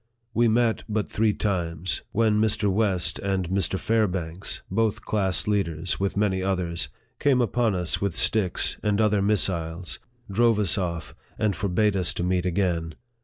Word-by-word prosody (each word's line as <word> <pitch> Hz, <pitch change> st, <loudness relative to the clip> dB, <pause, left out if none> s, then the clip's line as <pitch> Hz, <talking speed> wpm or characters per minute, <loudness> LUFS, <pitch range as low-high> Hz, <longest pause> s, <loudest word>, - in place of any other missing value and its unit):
We 120 Hz, +1 st, +3 dB
met 115 Hz, 0 st, +2 dB
but 105 Hz, -1 st, -1 dB
three 110 Hz, 0 st, +1 dB
times, 85 Hz, -5 st, -2 dB
when 110 Hz, -1 st, +2 dB
Mr. 105 Hz, -2 st, +1 dB
West 95 Hz, -4 st, 0 dB
and 95 Hz, -2 st, -1 dB
Mr. 95 Hz, 0 st, +1 dB
Fairbanks, 95 Hz, -5 st, -1 dB
both 110 Hz, -2 st, 0 dB
class 95 Hz, -3 st, +1 dB
leaders, 90 Hz, -4 st, -1 dB
with 100 Hz, 0 st, -1 dB
many 100 Hz, -2 st, +1 dB
others, 90 Hz, -3 st, -2 dB, 0.3 s
came 140 Hz, -3 st, +3 dB
upon 120 Hz, -3 st, +1 dB
us 90 Hz, -2 st, -1 dB
with 100 Hz, -4 st, -1 dB
sticks 100 Hz, -6 st, +2 dB
and 105 Hz, -1 st, 0 dB
other 105 Hz, -2 st, +3 dB
missiles, 90 Hz, -4 st, 0 dB, 0.3 s
drove 115 Hz, +1 st, +3 dB
us 100 Hz, -5 st, +2 dB
off, 85 Hz, -5 st, -3 dB, 0.2 s
and 105 Hz, -3 st, 0 dB
forbade 100 Hz, +3 st, +1 dB
us 90 Hz, -3 st, +1 dB
to -, -, -2 dB
meet 90 Hz, 0 st, 0 dB
again. 85 Hz, -3 st, -1 dB
100 Hz, 155 wpm, -25 LUFS, 90-105 Hz, 0.3 s, We